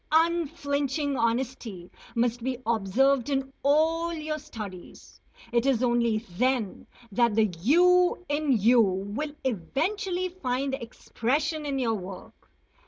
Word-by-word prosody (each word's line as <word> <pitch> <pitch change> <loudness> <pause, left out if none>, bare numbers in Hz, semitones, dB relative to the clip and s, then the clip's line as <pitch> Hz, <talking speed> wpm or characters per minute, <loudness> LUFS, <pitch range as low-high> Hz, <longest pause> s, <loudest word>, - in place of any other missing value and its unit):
#Unflinching 290 -3 +1
honesty# 230 -6 -2 0.2
must 235 0 +1
be 255 0 -1
observed 235 +5 +2
in 270 -1 -1
all 320 +4 +2
your 310 -2 -3
studies. 205 -10 -10 0.3
It 235 +2 +2
is 255 -3 +2
only 235 -2 +2
then 230 +3 -1 0.2
that 235 +1 +2
the 215 -4 +2
"you" 360 - +4
in 290 -3 +1
you 235 +4 +5
will 205 +9 -2
eventually 350 - -1
find 270 -6 -2
expression 285 +5 -2
in 275 -1 -1
your 240 -4 +1
work. 190 -2 -9
265 Hz, 115 wpm, -27 LUFS, 230-300 Hz, 0.3 s, you